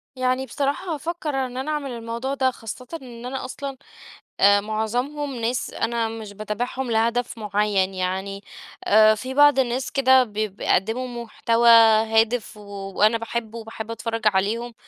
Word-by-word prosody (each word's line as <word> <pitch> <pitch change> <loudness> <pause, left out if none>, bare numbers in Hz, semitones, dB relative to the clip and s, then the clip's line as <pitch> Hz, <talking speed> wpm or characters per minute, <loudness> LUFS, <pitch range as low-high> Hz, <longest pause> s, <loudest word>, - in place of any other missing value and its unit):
يعني 255 +1 0
بصراحة 285 +7 -2
هافكر 325 +1 -4
إن 255 -1 -2
أنا 285 +4 -3
أعمل 290 -3 -3
الموضوع 235 +3 -4
ده، 260 -1 +1
خاصةً 245 +2 -9
إن 240 -2 -10
أنا 260 +1 -4
أَصْلًا 275 +1 -6 0.6
آآ، 200 +1 +6
معظمهم 245 +7 -2
ناس 235 +2 -2
أنا 230 -1 -1
مش 220 -2 -8
باتابعهم 235 +5 -4
لهدف 230 +2 0
معين، 205 -2 0
يعني 190 +2 -3 0.4
آآ، 215 +1 +6
في 255 +5 -6
بعض 290 -1 +6
الناس 250 0 -1
كده 260 -1 +5
ب 215 -4 -12
بيقدموا 215 +3 -1 0.2
محتوى 230 +1 +2 0.4
هادف 225 0 +1
وأنا 200 +2 0
باحبه 230 0 -5
وباحب 225 0 -7
أتفرج 230 0 -4
عليهم، 215 +4 0
230 Hz, 140 wpm, -23 LUFS, 215-255 Hz, 0.6 s, آآ